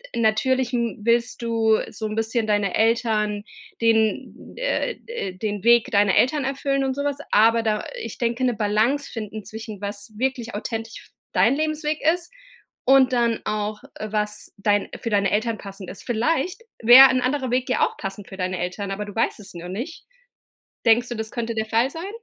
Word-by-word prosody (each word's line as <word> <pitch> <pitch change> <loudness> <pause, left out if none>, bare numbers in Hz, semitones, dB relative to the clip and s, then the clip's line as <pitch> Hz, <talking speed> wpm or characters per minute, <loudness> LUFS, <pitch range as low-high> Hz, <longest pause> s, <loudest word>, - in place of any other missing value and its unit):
natürlich 245 +3 +1
n 235 -2 -1
willst 235 +2 +1
du 225 -2 +2
so 220 0 -4
'n 215 - -5
bisschen 225 +1 0
deine 205 -3 +1
Eltern 220 -2 +1 0.4
den 220 -1 0
äh, - - -1
äh, 450 - -4
den 205 0 -3
Weg 235 +2 +5
deiner 200 -3 +4
Eltern 290 +3 +3
erfüllen 275 0 -1
und 265 -1 0
sowas. 285 0 -1
Aber 225 +2 +5
da, 215 -1 0
äh - - -8
ich 230 - -7
denke, 235 +1 -1
'ne 250 -1 +2
Balance 220 +7 +1
finden 215 -2 -6
zwischen, 220 -2 -8
was 205 +1 -6
wirklich 250 -1 -2
authentisch 225 +1 -5
f - - -24 0.2
dein 210 +8 +3
Lebensweg 310 0 -1
ist 350 +6 -7 0.5
und 265 0 +5
dann 235 -2 +2
auch, 210 0 -2
äh, 215 -1 -6
was 210 -1 -2
dein 205 0 +1
für 230 - -2
deine 200 -2 +2
Eltern 220 +1 0
passend 195 -2 -9
ist. 190 - -10
Vielleicht 320 - -1 0.2
wäre 250 +4 +10
'n 255 -1 +1
anderer 260 0 -1
Weg 255 +1 0
ja 255 - +3
auch - - -10
passend 195 +1 -6
für 190 - -9
deine 185 -1 -2
Eltern, 180 +3 -4
aber 205 +1 -3
du 205 - -10
weißt 225 - 0
es 205 - -9
nur 175 0 -8
nicht. 245 - -6 0.8
Denkst 240 +2 +4
du, 240 - -4
das 220 0 -4
könnte 235 -1 -3
der 220 0 -2
Fall 230 +4 +2
sein? 335 +5 -6
225 Hz, 190 wpm, -23 LUFS, 210-255 Hz, 0.8 s, wäre